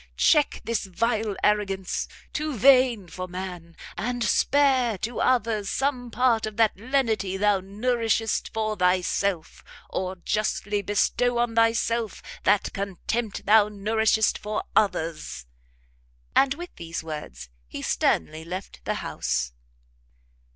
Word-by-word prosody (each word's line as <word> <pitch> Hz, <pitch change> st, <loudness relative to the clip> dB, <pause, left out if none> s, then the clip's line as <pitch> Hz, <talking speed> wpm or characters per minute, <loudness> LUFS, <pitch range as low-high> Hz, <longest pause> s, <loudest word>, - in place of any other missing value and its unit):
check 300 Hz, -3 st, +3 dB
this 230 Hz, -3 st, -2 dB
vile 215 Hz, +2 st, -1 dB
arrogance, 195 Hz, -3 st, 0 dB, 0.3 s
too 305 Hz, -2 st, -2 dB
vain 255 Hz, -4 st, +5 dB
for 185 Hz, +2 st, -6 dB
man, 180 Hz, -2 st, -7 dB, 0.2 s
and 245 Hz, +1 st, -2 dB
spare 260 Hz, -2 st, +3 dB
to 230 Hz, +6 st, -4 dB
others 225 Hz, -5 st, +1 dB
some 260 Hz, -3 st, -1 dB
part 235 Hz, -2 st, +2 dB
of 215 Hz, -1 st, -8 dB
that 225 Hz, -2 st, +3 dB
lenity 220 Hz, -5 st, 0 dB
thou 205 Hz, 0 st, +3 dB
nourishest 225 Hz, +3 st, -1 dB
for 215 Hz, -1 st, -1 dB
thyself, 180 Hz, -1 st, 0 dB, 0.3 s
or 185 Hz, 0 st, -2 dB
justly 205 Hz, +2 st, -1 dB
bestow 240 Hz, +4 st, +1 dB
on 240 Hz, -1 st, +1 dB
thyself 230 Hz, -1 st, +1 dB, 0.2 s
that 205 Hz, +1 st, +2 dB
contempt 200 Hz, +3 st, -3 dB
thou 210 Hz, 0 st, +5 dB
nourishest 220 Hz, +1 st, +1 dB
for 210 Hz, +1 st, -3 dB
others!" 160 Hz, -, 0 dB, 0.9 s
And 275 Hz, 0 st, +4 dB
with 350 Hz, +3 st, -9 dB
these 170 Hz, 0 st, -5 dB
words 150 Hz, -, -7 dB, 0.2 s
he -, -, -7 dB
sternly 155 Hz, -, 0 dB
left 185 Hz, +4 st, -7 dB
the -, -, -1 dB
house. -, -, -2 dB
210 Hz, 120 wpm, -25 LUFS, 185-235 Hz, 0.9 s, vain